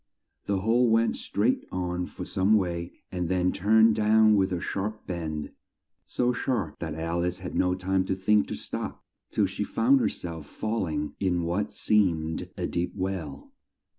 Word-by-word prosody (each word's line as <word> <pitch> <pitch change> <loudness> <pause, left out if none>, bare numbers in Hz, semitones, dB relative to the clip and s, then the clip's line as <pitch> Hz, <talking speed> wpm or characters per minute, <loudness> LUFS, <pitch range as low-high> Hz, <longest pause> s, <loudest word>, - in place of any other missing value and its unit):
The 100 -2 0
hole 115 +4 +3
went 115 +1 +3
straight - - 0
on 90 -1 -2
for - - -7
some 95 +3 +2
way 85 -3 -1 0.2
and 90 -2 -2
then 90 0 +2
turned 110 +3 +4
down 110 0 +5
with 95 -1 +2
a 90 - -1
sharp 105 +5 -4
bend, 80 -4 -4 0.6
so 125 0 +1
sharp 120 - -2
that 80 -3 -4
Al 85 +2 -1
ice 90 - -1
had 95 -1 -7
no 90 0 +2
time 95 0 0
to 95 - -1
think 105 +2 +3
to - - -4
stop - - -5 0.3
till - - +2
she - - -3
found 130 +4 +3
her - - +2
self 80 -4 -7
fall 110 0 -2
ing 75 -2 -3
in 90 -3 +1
what 90 +5 -1
seemed 85 -7 +1
a - - -1
deep 85 +1 -2
well. 90 -8 -4
95 Hz, 175 wpm, -27 LUFS, 85-105 Hz, 0.6 s, down